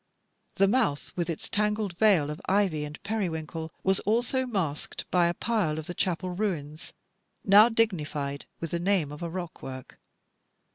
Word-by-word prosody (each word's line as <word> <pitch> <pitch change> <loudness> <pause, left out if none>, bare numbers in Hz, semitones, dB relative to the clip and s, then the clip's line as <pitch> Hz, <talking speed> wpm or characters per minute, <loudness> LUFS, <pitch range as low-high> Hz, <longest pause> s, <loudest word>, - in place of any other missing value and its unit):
The 195 - +4
mouth, 210 - +1
with 175 -1 -1
its 165 - -3
tangled 210 -3 0
veil 185 -9 +4
of 150 - -7
ivy 185 -7 +2
and 150 +1 -8
periwinkle, 165 -6 -3
was 190 0 +3
also 245 +4 +1
masked 180 - -3
by 175 -1 +4
a 170 - +1
pile 205 -10 0
of 160 - -4
the 175 - -5
chapel 180 0 -1
ruins, 170 -6 -3 0.5
now 210 +3 +8
dignified 155 -11 -1
with 165 - -4
the 170 - -1
name 175 -5 +1
of 150 - -9
a 170 - -3
rockwork. 160 -7 -7
180 Hz, 155 wpm, -28 LUFS, 155-205 Hz, 0.5 s, now